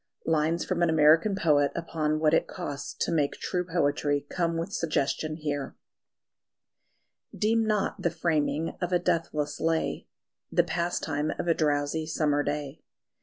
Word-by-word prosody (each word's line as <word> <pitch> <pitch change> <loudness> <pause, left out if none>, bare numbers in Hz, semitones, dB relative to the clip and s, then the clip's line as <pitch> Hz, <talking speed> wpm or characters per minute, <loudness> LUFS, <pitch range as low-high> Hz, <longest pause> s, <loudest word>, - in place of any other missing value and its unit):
Lines 160 +1 +1
from 180 -2 -1
an 170 - +4
American 160 +6 +5
poet 145 -6 +3
upon 155 -2 -1
what 155 -1 +3
it - - +3
costs 145 0 -6
to - - -2
make 150 -4 +1
true 180 -1 -2
poetry, 145 -4 0
come 170 -2 0
with 170 +4 -4
suggestion 155 -1 -1
here: 145 -3 -4 1.6
Deem 225 +2 +2
not 210 -2 0
the 170 - +2
framing 160 -1 -1
of 180 0 -1
a 180 - +4
deathless 160 -4 -1
lay 165 0 -1 0.4
The - - +4
pastime 160 -3 -1
of - - -3
a 165 - +5
drowsy 150 0 0
summer 150 -2 +1
day. 145 0 -4
160 Hz, 145 wpm, -28 LUFS, 150-170 Hz, 1.6 s, American